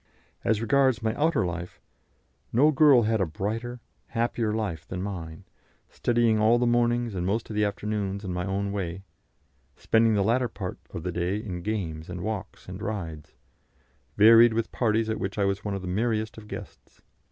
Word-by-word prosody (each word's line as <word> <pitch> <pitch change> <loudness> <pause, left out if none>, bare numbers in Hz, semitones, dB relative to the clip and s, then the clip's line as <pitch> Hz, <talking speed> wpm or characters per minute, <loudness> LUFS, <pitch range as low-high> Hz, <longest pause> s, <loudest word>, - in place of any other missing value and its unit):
As 110 -1 +1
regards 130 -1 +3
my 110 0 +1
outer 155 - +1
life, 85 0 -5 0.7
no 145 +6 +5
girl 140 -4 +6
had 110 -1 +1
a - - +3
brighter, 115 +9 -4 0.3
happier 115 -1 -1
life 100 -7 -3
than 90 - -5
mine; 85 -4 -6 0.5
studying 120 -2 +2
all 110 +2 +5
the 120 - +1
mornings 120 -1 +1
and 90 -2 -3
most 105 +5 -1
of - - -5
the 105 - +2
afternoons 100 -1 -2
in 90 - -3
my 90 0 -2
own 100 +1 -2
way, 95 -4 -2
and 95 - -12 0.7
spending 115 -1 +3
the 100 - +2
latter 120 +4 +2
part 95 -4 -6
of 85 -4 -7
the 90 - -2
day 90 +3 -1
in 95 -5 -5
games 85 -6 -4
and 90 0 -5
walks 105 0 -5
and 95 +2 -8
rides 85 -9 -5 0.8
varied 115 +2 +8
with 115 0 -1
parties 110 -2 +1
at 110 - -2
which 95 +2 -4
I 100 - +2
was 100 +2 -1
one 105 -1 -2
of 95 - -5
the - - -5
merriest 110 +3 -1
of 110 -1 -12
guests. - - -10
105 Hz, 185 wpm, -26 LUFS, 95-115 Hz, 0.8 s, varied